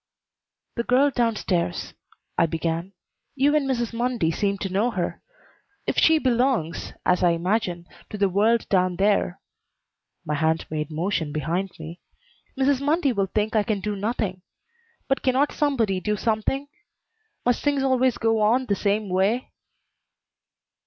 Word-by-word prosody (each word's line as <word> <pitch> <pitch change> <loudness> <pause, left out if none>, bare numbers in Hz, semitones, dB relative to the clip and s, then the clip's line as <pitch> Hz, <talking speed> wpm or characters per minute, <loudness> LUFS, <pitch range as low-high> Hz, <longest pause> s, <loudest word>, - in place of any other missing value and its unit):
"The 235 - 0
girl 265 +4 +3
down 235 -3 +1
stairs," 175 - -2 0.4
I 170 - +3
began. 165 +3 -3 0.4
"You 285 +2 +3
and 280 -3 +1
Mrs. 240 -3 -1
Mundy 235 -8 0
seem 200 +3 0
to 195 -1 -4
know 210 +5 +2
her. 185 -7 -3 0.6
If - - -1
she 320 0 +5
belongs, 250 - 0
as 180 - +3
I 175 -2 +4
imagine, 180 -1 -1 0.2
to 210 - -6
the 200 -1 +3
world 215 +5 +2
down 185 -2 +2
there," 195 -1 +1 0.9
my 150 - -2
hand 160 +2 +1
made 155 0 -2
motion 160 -1 -2
behind 170 +6 -2
me, 160 +2 -9 0.6
"Mrs. 270 0 +2
Mundy 290 -1 +2
will 195 -3 0
think 215 +3 -1
I 215 - +5
can 210 -1 -1
do 205 +2 -3
nothing. 200 -3 -2 0.7
But 270 - 0
cannot 265 +3 +2
somebody 235 -10 +1
do 210 +2 -1
something? 230 +6 -1 0.8
Must 245 -1 +1
things 285 -2 +1
always 260 -2 +2
go 225 -1 +1
on 235 +5 +3
the 205 - 0
same 205 +2 0
way?" 195 +7 0
210 Hz, 150 wpm, -24 LUFS, 180-250 Hz, 0.9 s, she